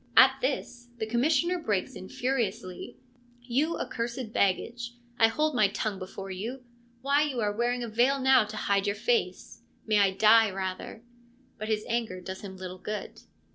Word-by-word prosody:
At - - +7
this 245 - -3
the 220 - -2
Commissioner 310 +10 +1
breaks 205 - -1
in 185 - -9
furiously: 230 -8 -3 0.4
1 240 0 -16
You 305 +7 +1
accursed 235 -1 -4
baggage, 235 +5 0 0.2
I 225 - +7
hold 305 +7 0
my 215 -5 +4
tongue 200 0 -3
before 190 +1 -7
you! 230 +8 -5 0.4
Why, 280 +2 +3
you 290 -5 -1
are 205 -2 0
wearing 240 +2 0
a - - -4
veil 245 +5 +2
now 265 -3 +5
to 215 +1 -8
hide 200 -1 +1
your 200 - 0
face. 470 - -1 0.2
May 215 -1 +3
I 200 -1 +5
die 220 +3 +5
rather.' 190 +3 -5 0.6
But 215 - -4
his 215 -1 -1
anger 230 -6 -2
does 190 +1 -7
him 190 -2 -8
little 185 0 -7
good. 210 +1 -6
225 Hz, 175 wpm, -28 LUFS, 200-250 Hz, 0.6 s, At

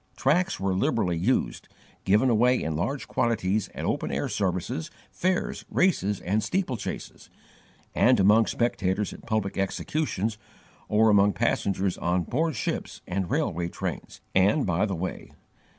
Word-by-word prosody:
Tracts 175 +8 +1
were 95 0 0
liberally 95 -1 +1
used, 95 +11 0 0.4
given 105 +6 +4
away 125 +3 +4
in 80 -1 -2
large 135 - -2
quantities 110 -3 0
at - - -4
open - - -1
air - - -1
services, 80 - -2 0.2
fairs, 185 0 -1
races 105 - +1
and 105 +5 0
steeplechases, 175 - -4 0.6
and 125 -2 +4
among 105 +3 +5
spectators 105 -4 0
at - - -13
public 110 -4 -1
executions, 110 +1 -2 0.5
or 110 +1 +4
among 100 0 +5
passengers 95 -1 0
on 90 +1 +1
board 155 - -1
ships - - -3
and 90 -1 -2
railway 85 +1 0
trains, - - -6
and 100 +10 +3
by 90 +3 +1
the 95 - -2
way. 90 +3 -5
105 Hz, 135 wpm, -26 LUFS, 95-125 Hz, 0.6 s, among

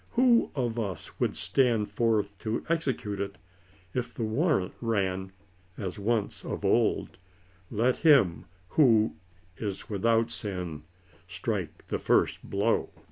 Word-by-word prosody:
Who 245 -1 +4
of 120 -4 -1
us 100 -7 -5
would - - +1
stand 115 -6 +1
forth 105 -2 +1
to 110 +1 -2
execute 135 -11 -1
it, 100 0 -4 0.6
if 125 -2 -3
the 115 - -2
warrant 110 - +1
ran, 95 -5 -1 0.5
as 95 -1 -4
once 110 0 -1
of - - -4
old, - - +1 0.3
" 95 0 -32
let 120 +4 +1
him 135 - +4 0.2
who 110 - +4 0.4
is 105 0 -5
without 115 +3 +2
sin" 90 -9 -4 0.5
strike 90 -2 -4
the - - -1
first - - +2
blow - - 0
110 Hz, 130 wpm, -28 LUFS, 95-120 Hz, 0.6 s, Who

